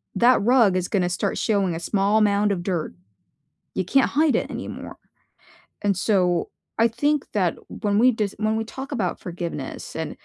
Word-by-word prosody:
that 245 -1 +4
rug 230 -3 +4
is 180 -1 -1
gonna 185 -4 0
start 180 - -2
showing 200 -6 +1
a - - -4
small 200 +4 +1
amount 205 -1 +3
of 180 -3 -2
dirt. 175 - -2 0.8
You 185 - -1
can't 270 +9 +3
hide 300 +1 +2
it - - -2
anymore. - - -7 0.9
And 200 -1 +1
so, 180 -4 +1 0.3
I 230 - +6
think 290 +5 0
that 185 -5 +1
when 205 -1 -1
we 255 +2 +6
dis 210 -3 -2
when 215 0 +1
we 225 - -1
talk 265 +5 -8
about 215 -10 -2
forgiveness 170 -1 -6
and - - -3
205 Hz, 175 wpm, -23 LUFS, 185-230 Hz, 0.9 s, I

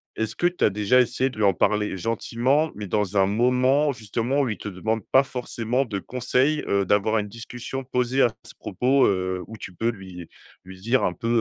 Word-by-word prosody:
est-ce 110 0 -3
que 175 - +2
tu 175 0 0
as - - +4
déjà 105 +5 +2
essayé 125 +2 +1
de 125 - -13
lui 110 - +2
en 100 - +4
parler 105 +3 0
gentiment, 120 - 0
mais 105 -1 -6
dans 105 0 -1
un 95 -1 +5
moment 125 +7 +2
justement 115 +4 -1
où 135 - 0
il 105 - -3
te - - -8
demande 110 +4 -2
pas 135 - +7
forcément 125 0 -2
de 105 -5 -4
conseil, 130 +6 0
heu, 100 0 +2
d'avoir 105 +3 +2
une 105 0 -4
discussion 120 +4 -7
posée 125 +1 0
à 120 - +2
ce - - -12
propos, 130 +8 +2
heu, 95 -1 -1
où 110 - -9
tu 95 - -8
peux 115 +6 -1
lui 95 -5 -10 0.4
lui 95 0 -11
dire 120 +6 +1
un - - 0
peu, 115 - -6
115 Hz, 215 wpm, -24 LUFS, 100-130 Hz, 0.4 s, pas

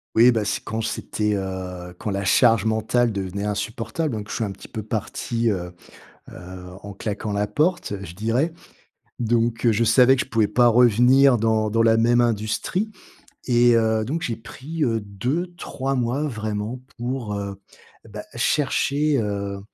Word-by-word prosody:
Oui, 120 +3 +7
bah, 110 -3 0
c'est - - -2
quand 110 +1 -3
c'était, 105 -1 -2
heu, 90 -2 -5
quand - - -3
la 100 0 -2
charge 115 +1 +4
mentale 110 +2 +1
devenait 100 -1 -4
insupportable. 115 +7 -3
Donc 105 -1 -6
je - - -4
suis - - -1
un 105 - -2
petit - - -11
peu 110 - -6
parti, 115 +2 -2
heu 90 -3 -4 0.6
heu, 90 0 -10 0.2
en 100 0 -8
claquant 105 +1 -4
la 100 0 0
porte, 170 - 0
je 85 -2 -9
dirais. 115 - 0 0.7
Donc 115 0 0
heu, 115 - +6
je 110 +2 +2
savais 125 +3 +6
que - - +1
je - - -22
pouvais 110 -4 +2
pas 120 0 +4
revenir 125 +3 +5
dans 110 -1 +1
dans 115 +2 +2
la 115 0 +5
même 120 +2 +3
industrie 120 - -1 0.5
et 120 -1 +4
heu, 110 -1 +2
donc 155 +8 -2
j'ai 115 -6 -3
pris, 150 +8 -5
heu, 115 -3 0
2-3 135 - -3
mois, 125 +3 0
vraiment, 110 -1 -4 0.2
pour, 120 -2 -3
heu, 100 -1 -5 0.5
eh, - - -14
bah 105 0 -7
chercher, 145 +3 +1
heu, 100 -1 -3
115 Hz, 170 wpm, -23 LUFS, 105-125 Hz, 0.7 s, Oui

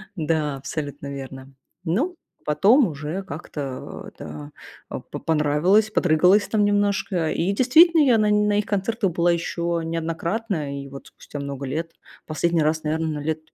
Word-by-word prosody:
Да, 155 -4 -1
абсолютно 145 0 -5
верно. 135 0 -9 0.3
Ну, 255 - 0 0.3
потом 210 - +4
уже 155 +4 -5
как-то, 145 -5 -7
э, - - -11
да, 75 -1 -8 0.4
а, - - -4
по - - -8
понравилось, 160 +8 +2
подрыгалась 180 +2 +4
там 215 -2 +1
немножко. 200 -5 +1
И 175 +4 0
действительно, 315 - +6
я 255 -6 +5
на 210 0 +3
нь 210 0 +3
на 205 0 +2
их 210 - -1
концертах 205 0 -1
была 170 +1 +2
еще 170 0 -1
неоднократно. 165 -2 -3
И - - -10
вот 135 0 -10
спустя 145 - -10
много 140 -1 -5
лет 165 +5 -4 0.3
последний 165 +1 +1
раз, 155 +1 0
наверное, 155 -1 -2
лет 160 +1 -1
165 Hz, 155 wpm, -23 LUFS, 150-205 Hz, 0.4 s, действительно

